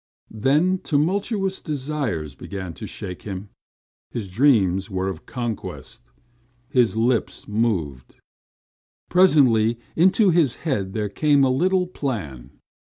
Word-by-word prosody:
Then 150 Hz, -, +2 dB
tumultuous 190 Hz, +5 st, 0 dB
desires 135 Hz, -, -3 dB
began 95 Hz, -3 st, -7 dB
to -, -, -8 dB
shake 90 Hz, -1 st, -7 dB
him. 100 Hz, 0 st, -7 dB, 0.6 s
His 110 Hz, -5 st, -5 dB
dreams 95 Hz, -4 st, +2 dB
were 95 Hz, 0 st, -2 dB
of 95 Hz, -, -8 dB
conquest. 120 Hz, -4 st, -5 dB, 0.7 s
His 120 Hz, -5 st, +2 dB
lips 115 Hz, +1 st, 0 dB
moved. 95 Hz, -, -2 dB, 1.0 s
Presently 130 Hz, -11 st, +4 dB, 0.2 s
into 190 Hz, +4 st, +4 dB
his 160 Hz, -7 st, +2 dB
head 100 Hz, -, -1 dB
there 105 Hz, -2 st, -1 dB
came 145 Hz, +6 st, +3 dB
a 130 Hz, -, +3 dB
little 180 Hz, +7 st, +2 dB
plan. 105 Hz, -, -5 dB
120 Hz, 110 wpm, -23 LUFS, 95-155 Hz, 1.0 s, Presently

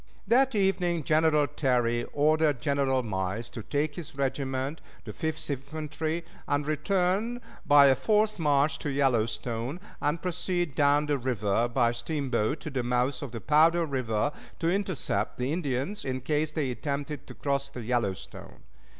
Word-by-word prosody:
That 250 Hz, +4 st, +3 dB
evening 180 Hz, -4 st, +1 dB
General 155 Hz, 0 st, +3 dB
Terry 120 Hz, -5 st, +1 dB
ordered 150 Hz, -1 st, +2 dB
General 140 Hz, -3 st, +1 dB
Miles 105 Hz, +2 st, -3 dB
to 115 Hz, -, -6 dB
take 145 Hz, +6 st, -1 dB
his 160 Hz, -4 st, -8 dB
regiment, 135 Hz, +1 st, -2 dB, 0.2 s
the 105 Hz, -, -6 dB
Fifth 160 Hz, +5 st, -3 dB
Infantry, 155 Hz, +4 st, -3 dB, 0.2 s
and 145 Hz, 0 st, 0 dB
return 190 Hz, +9 st, 0 dB, 0.3 s
by 145 Hz, -1 st, +8 dB
a 135 Hz, -, +7 dB
forced 215 Hz, -, +2 dB
march 145 Hz, -1 st, +2 dB
to 145 Hz, -, -3 dB
Yellowstone, 125 Hz, 0 st, 0 dB, 0.2 s
and 150 Hz, +3 st, 0 dB
proceed 175 Hz, -2 st, -2 dB
down 145 Hz, +1 st, +3 dB
the 145 Hz, -2 st, 0 dB
river 115 Hz, -3 st, 0 dB
by 120 Hz, -1 st, +2 dB
steamboat 135 Hz, +1 st, -1 dB
to 155 Hz, -, -6 dB
the 135 Hz, -2 st, -1 dB
mouth 125 Hz, +2 st, 0 dB
of 140 Hz, -5 st, -6 dB
the 115 Hz, -2 st, -6 dB
Powder 165 Hz, -, +4 dB
River, 130 Hz, -2 st, -1 dB, 0.3 s
to 165 Hz, 0 st, +1 dB
intercept 185 Hz, -, -1 dB
the 125 Hz, +4 st, -1 dB
Indians, 155 Hz, +3 st, -2 dB
in 130 Hz, -1 st, -3 dB
case 150 Hz, +3 st, 0 dB
they 150 Hz, -5 st, -1 dB
attempted 140 Hz, +2 st, -4 dB
to -, -, -10 dB
cross 140 Hz, -1 st, -1 dB
the 125 Hz, -3 st, -7 dB
Yellowstone. 110 Hz, -5 st, -3 dB
145 Hz, 150 wpm, -28 LUFS, 125-160 Hz, 0.3 s, by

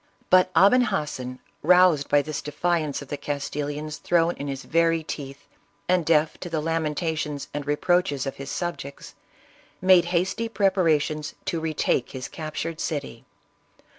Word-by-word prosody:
But 185 Hz, 0 st, +6 dB
Aben 245 Hz, +6 st, +6 dB
Hassan, 130 Hz, -, -3 dB, 0.2 s
roused 180 Hz, -3 st, +5 dB
by 145 Hz, 0 st, +4 dB
this 155 Hz, 0 st, -4 dB
defiance 155 Hz, -1 st, -1 dB
of 140 Hz, -, -16 dB
the 145 Hz, -, -3 dB
Castilians 145 Hz, +1 st, -4 dB
thrown 170 Hz, 0 st, +2 dB
in 145 Hz, -, -5 dB
his 135 Hz, -1 st, -4 dB
very 165 Hz, 0 st, +2 dB
teeth, 140 Hz, -3 st, -7 dB, 0.4 s
and 180 Hz, -1 st, +3 dB
deaf 155 Hz, -1 st, +2 dB
to 175 Hz, -, -6 dB
the 165 Hz, -2 st, -1 dB
lamentations 155 Hz, -2 st, -2 dB
and 145 Hz, -1 st, -4 dB
reproaches 145 Hz, -2 st, +1 dB
of 135 Hz, -, -5 dB
his 140 Hz, 0 st, -7 dB
subjects, 170 Hz, -5 st, -5 dB, 0.7 s
made 185 Hz, -2 st, +5 dB
hasty 185 Hz, +6 st, -1 dB
preparations 160 Hz, -7 st, +1 dB
to 185 Hz, -4 st, -1 dB
retake 155 Hz, -5 st, -1 dB
his 130 Hz, -1 st, -5 dB
captured 160 Hz, +1 st, -5 dB
city. 140 Hz, -7 st, -4 dB
155 Hz, 140 wpm, -25 LUFS, 145-175 Hz, 0.7 s, But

